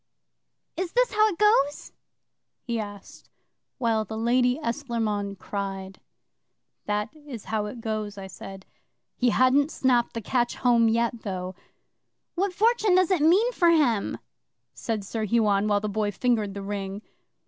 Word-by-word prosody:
'"Is 360 -1 -3
this - - +2
how 430 0 +5
it 390 -6 -3
goes?" 300 -9 +2 0.7
he 235 -2 -2
asked, 205 -2 -9 0.5
while 230 -4 +1
the 220 +1 -7
Lady 245 +2 +2
Esclairmonde 230 -8 -2
cried. 195 -1 -5 0.9
'"That 210 +7 -2
is 290 -8 -10
how 210 -1 0
it 230 +2 -8
goes," 215 -2 -3
I 195 - -7
said. 190 0 -10 0.5
He 245 - +2
hadn't 255 +5 +3
snapped 250 -6 +1
the 230 - -3
catch 240 +2 0
home 235 -2 +3
yet, 235 +1 0
though. 185 -2 -4 0.8
'"What 385 +2 0
fortune 430 0 +3
does 370 0 +3
it 360 -5 +2
mean 380 +10 +4
for 345 -8 +3
him?" 270 -11 +2 0.6
said 225 -4 -3
Sir 220 +2 -3
Huon, 210 -2 +2
while 205 -1 +2
the 215 - -2
Boy 210 0 -1
fingered 215 -2 0
the 200 - -5
ring. 200 0 -5
230 Hz, 150 wpm, -26 LUFS, 205-285 Hz, 0.9 s, how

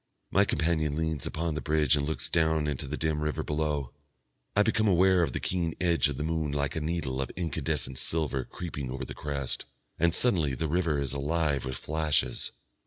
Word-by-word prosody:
My - - +5
companion 80 -2 +1
leans 80 -3 -1
upon 80 0 -2
the 75 - -3
bridge 75 -3 +3
and 70 -1 -1
looks 80 - 0
down 80 -2 +2
into 75 -1 -2
the 75 - -3
dim 80 -1 0
river 75 0 -1
below. 75 -3 -1 0.6
I 105 - +6
become 110 0 +2
aware 95 -1 +5
of 80 -6 +1
the - - -1
keen 85 -3 -1
edge 85 -4 +3
of 70 - -4
the 75 - -2
moon 80 -2 0
like 70 -1 -1
a 80 - -1
needle 75 -5 -1
of 65 - -3
incandescent 80 -6 -2
silver 75 -5 0
creeping 75 -3 -5
over 65 +1 -4
the - - -7
crest, 70 -3 -3 0.3
and 85 0 +3
suddenly 80 - +2
the 80 +4 -1
river 80 -2 +1
is 70 -1 -2
alive 75 -1 0
with 65 0 -3
flashes. 80 -1 0
75 Hz, 195 wpm, -29 LUFS, 70-80 Hz, 0.6 s, I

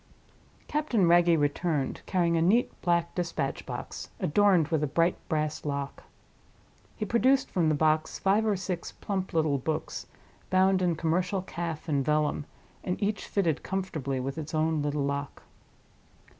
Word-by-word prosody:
Captain 255 - +1
Wragge 170 0 +5
returned, 145 -1 0
carrying 170 -3 +2
a 165 - +2
neat 210 +9 +3
black 170 -1 +1
dispatch 165 -6 -3
box, - - -6
adorned 180 -2 +3
with 160 -3 +1
a 150 - +1
bright 165 +5 +2
brass 155 -1 -1
lock. 140 -1 -4 1.0
He 215 - -2
produced 260 +5 +2
from 170 -4 +2
the 155 - +2
box 155 +1 +1
five 200 +3 +2
or 215 -2 +2
six 185 -1 -4
plump 190 -2 -3
little 155 -4 +1
books, 155 +4 -3 0.4
bound 185 0 +3
in 175 -2 +2
commercial 180 +4 0
calf 170 -3 -5
and 140 -3 +1
vellum, 150 0 0 0.4
and 180 - -2
each 210 0 -1
fitted 170 -7 0
comfortably 155 -9 -3
with 135 +4 -3
its 155 +1 -5
own 155 0 +1
little 145 0 -1
lock. 140 0 -3
165 Hz, 150 wpm, -28 LUFS, 150-185 Hz, 1.0 s, Wragge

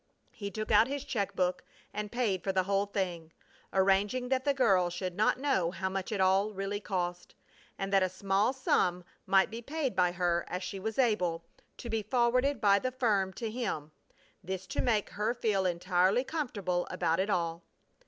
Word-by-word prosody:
He 200 -1 -6
took 215 +1 -4
out 220 +2 +6
his 280 0 -3
check 200 -3 -2
book 180 0 0 0.3
and 210 0 -4
paid 215 -8 0
for 195 - 0
the 190 -1 +2
whole 200 +1 +1
thing, 175 -5 -3 0.4
arranging 200 +6 +2
that 260 0 0
the 285 - +4
girl 195 -9 +3
should 180 +1 -4
not 215 +5 +2
know 260 -12 +1
how 190 +2 -3
much 190 +1 -4
it 210 - -2
all 190 +3 +3
really 195 +1 -3
cost, 180 -3 -4 0.4
and 195 0 -3
that 195 - +5
a 185 - +2
small 195 +4 +1
sum 180 -9 +1 0.2
might 195 +1 +4
be 230 +1 -6
paid 275 +1 -2
by 180 -1 +3
her 175 -1 +1
as 180 +1 -4
she 190 +1 -5
was 220 +3 -4
able, 180 -10 +1 0.3
to - - -8
be 225 -1 -1
forwarded 250 +5 +2
by 200 -2 +4
the 255 +3 -2
firm 215 -7 +1
to 225 +1 -4
him; 185 -11 -3 0.5
this 190 +1 -4
to - - -2
make 220 -5 +1
her 215 +4 -1
feel 210 -6 +1
entirely 180 +5 +2
comfortable 235 - -2
about 165 -1 0
it 195 +2 0
all. 170 -3 -1
195 Hz, 190 wpm, -31 LUFS, 185-230 Hz, 0.5 s, out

